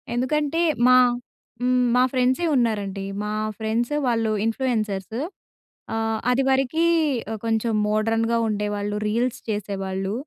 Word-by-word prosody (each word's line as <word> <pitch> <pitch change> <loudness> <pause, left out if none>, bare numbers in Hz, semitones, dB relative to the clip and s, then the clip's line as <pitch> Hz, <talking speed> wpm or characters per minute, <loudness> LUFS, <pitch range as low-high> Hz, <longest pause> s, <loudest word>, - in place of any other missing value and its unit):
ఎందుకంటే 300 +6 0 0.3
మా 255 - +7 0.6
హ్మ్. 250 0 +2
మా 250 - +5
ఫ్రెండ్సే 255 +5 +1
ఉన్నారండి. 205 -5 0 0.2
మా 210 0 -3 0.2
ఫ్రెండ్స్ 225 +3 -1 0.2
వాళ్ళు 225 -2 +1
ఇన్‌ఫ్లుయెన్సర్స్. 220 -3 -1 0.8
ఆహ్, 225 0 -1
అదివరకి 270 +4 +2 0.6
కొంచెం 225 0 0
మోడ్రన్‌గా 225 +2 +1
ఉండేవాళ్ళు, 205 -1 -2
రీల్స్ 235 +3 0
చేసేవాళ్ళు. 195 -2 -3
225 Hz, 100 wpm, -23 LUFS, 210-250 Hz, 0.8 s, మా